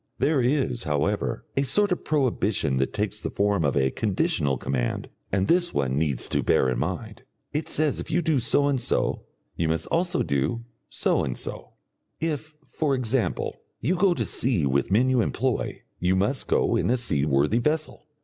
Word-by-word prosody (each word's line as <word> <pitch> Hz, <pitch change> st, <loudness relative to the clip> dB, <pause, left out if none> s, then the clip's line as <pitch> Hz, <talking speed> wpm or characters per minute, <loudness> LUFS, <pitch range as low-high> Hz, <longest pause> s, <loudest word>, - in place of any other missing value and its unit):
There 140 Hz, +1 st, +2 dB
is, 125 Hz, -1 st, 0 dB
however, 75 Hz, -2 st, -1 dB
a 135 Hz, -, +2 dB
sort 200 Hz, +10 st, +2 dB
of 180 Hz, -, -1 dB
prohibition 110 Hz, -, +1 dB
that 65 Hz, +1 st, 0 dB
takes 105 Hz, 0 st, -2 dB
the -, -, -3 dB
form 100 Hz, -3 st, +1 dB
of 70 Hz, -1 st, +1 dB
a 65 Hz, -1 st, +2 dB
conditional 70 Hz, -2 st, 0 dB
command, 65 Hz, -1 st, -2 dB, 0.2 s
and 95 Hz, 0 st, +1 dB
this 175 Hz, 0 st, +2 dB
one 65 Hz, 0 st, 0 dB
needs 75 Hz, -6 st, +1 dB
to -, -, +1 dB
bear 65 Hz, -, +3 dB
in 60 Hz, -1 st, -1 dB
mind. -, -, -4 dB, 0.3 s
It 150 Hz, +1 st, -2 dB
says 155 Hz, -1 st, +1 dB
if -, -, -6 dB
you 175 Hz, +2 st, +1 dB
do 155 Hz, -4 st, +2 dB
so 135 Hz, +4 st, +2 dB
and 135 Hz, -3 st, +1 dB
so, -, -, 0 dB, 0.3 s
you 85 Hz, -, 0 dB
must 80 Hz, 0 st, 0 dB
also 175 Hz, +2 st, +1 dB
do 115 Hz, -, -1 dB, 0.2 s
so -, -, +1 dB
and 65 Hz, -, -3 dB
so; -, -, -6 dB, 0.5 s
if, 155 Hz, -1 st, -3 dB
for 140 Hz, 0 st, -1 dB
example, 125 Hz, -1 st, -1 dB, 0.2 s
you 145 Hz, +11 st, +1 dB
go 185 Hz, -1 st, +3 dB
to -, -, -1 dB
sea 115 Hz, -, +1 dB
with 70 Hz, +3 st, +1 dB
men 115 Hz, +7 st, +3 dB
you 130 Hz, -2 st, +3 dB
employ, 125 Hz, +1 st, -1 dB, 0.2 s
you 90 Hz, +1 st, +2 dB
must 105 Hz, +8 st, 0 dB
go -, -, +2 dB
in -, -, +1 dB
a 125 Hz, -, +3 dB
seaworthy 75 Hz, -, +2 dB
vessel. 155 Hz, +3 st, -2 dB
115 Hz, 185 wpm, -25 LUFS, -, 0.5 s, bear